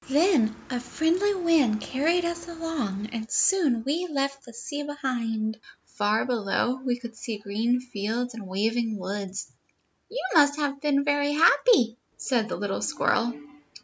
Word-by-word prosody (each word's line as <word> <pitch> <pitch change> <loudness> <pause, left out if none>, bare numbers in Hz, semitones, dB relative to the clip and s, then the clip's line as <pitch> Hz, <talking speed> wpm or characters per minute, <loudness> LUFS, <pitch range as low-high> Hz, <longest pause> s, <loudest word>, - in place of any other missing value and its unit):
Then 280 - +3 0.2
a 250 - -1
friendly 340 +10 +1
wind 320 - +3
carried 325 +10 0
us 340 0 -4
along, 295 - -4
and 225 -1 -5
soon 295 -12 +3
we 325 +8 -1
left 275 -2 -2
the 240 - -11
sea 285 +6 -5
behind. 235 -7 -2 0.3
Far 210 +1 0
below; 245 +2 0
we 245 -2 0
could 235 -2 -9
see 225 -1 -5
green 220 +4 0
fields 240 0 -3
and 225 -4 -8
waving 220 +3 0
woods." 195 +1 -5 0.6
"You - - -4
must 290 -3 +6
have 280 -2 -2
been 280 -2 +2
very 290 0 +1
happy" 300 - +4 0.2
said 235 -4 0
the - - -2
little 200 -1 -3
squirrel. 240 +1 +1
250 Hz, 145 wpm, -26 LUFS, 220-295 Hz, 0.6 s, must